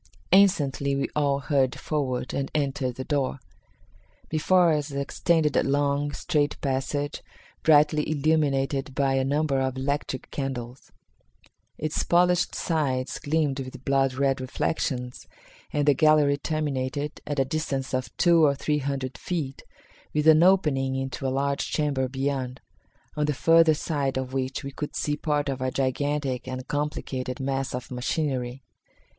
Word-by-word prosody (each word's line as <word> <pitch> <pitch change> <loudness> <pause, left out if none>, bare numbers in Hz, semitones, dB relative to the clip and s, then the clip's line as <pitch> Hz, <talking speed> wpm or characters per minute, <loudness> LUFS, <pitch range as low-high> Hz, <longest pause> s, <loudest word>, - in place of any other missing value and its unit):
Instantly 145 -8 +3
we 140 - -1
all 140 -2 +1
hurried 135 -3 +1
forward 130 -5 -2
and 135 0 -2
entered 135 -4 -1
the 130 - -5
door. 140 -1 -1 0.9
Before 170 +2 +3
us 150 -1 -1
extended 150 +2 0
a - - +4
long, 145 +1 +1
straight 150 -2 -1
passage, 140 +2 -2 0.4
brightly 150 -1 +4
illuminated 140 -3 +1
by 140 -2 +2
a 135 0 +2
number 140 0 +1
of 130 -1 -1
electric 135 -1 -3
candles. 130 -3 -5 0.9
Its 155 0 -1
polished 175 0 +2
sides 140 -6 -1
gleamed 145 -2 0
with 130 -1 -8
blood 135 -1 +2
red 135 -1 +1
reflections, 130 -1 -3 0.4
and 145 -1 0
the 145 - +7
gallery 150 0 +4
terminated, 145 -1 -3
at 145 - -2
a 135 - +3
distance 135 -2 -3
of 130 -1 -1
two 170 -2 +5
or 140 -2 +4
three 150 +2 0
hundred 135 -2 -3
feet, 150 -7 -4 0.5
with 150 0 +1
an 160 0 +7
opening 150 -8 +3
into 135 0 -3
a - - +1
large 140 +1 -1
chamber 140 -4 0
beyond, 135 -1 -2 0.6
on 150 - +1
the 150 - 0
further 165 +3 +5
side 140 -4 -2
of 130 0 -4
which 135 +2 -2
we 140 - -5
could 150 +2 -6
see 150 - 0
part 150 -1 -1
of 135 -2 -3
a 130 - 0
gigantic 135 0 -1
and 130 0 -5
complicated 145 -4 -3
mass 135 -1 -2
of 125 0 -7
machinery. 125 -1 -2
140 Hz, 145 wpm, -26 LUFS, 130-150 Hz, 0.9 s, the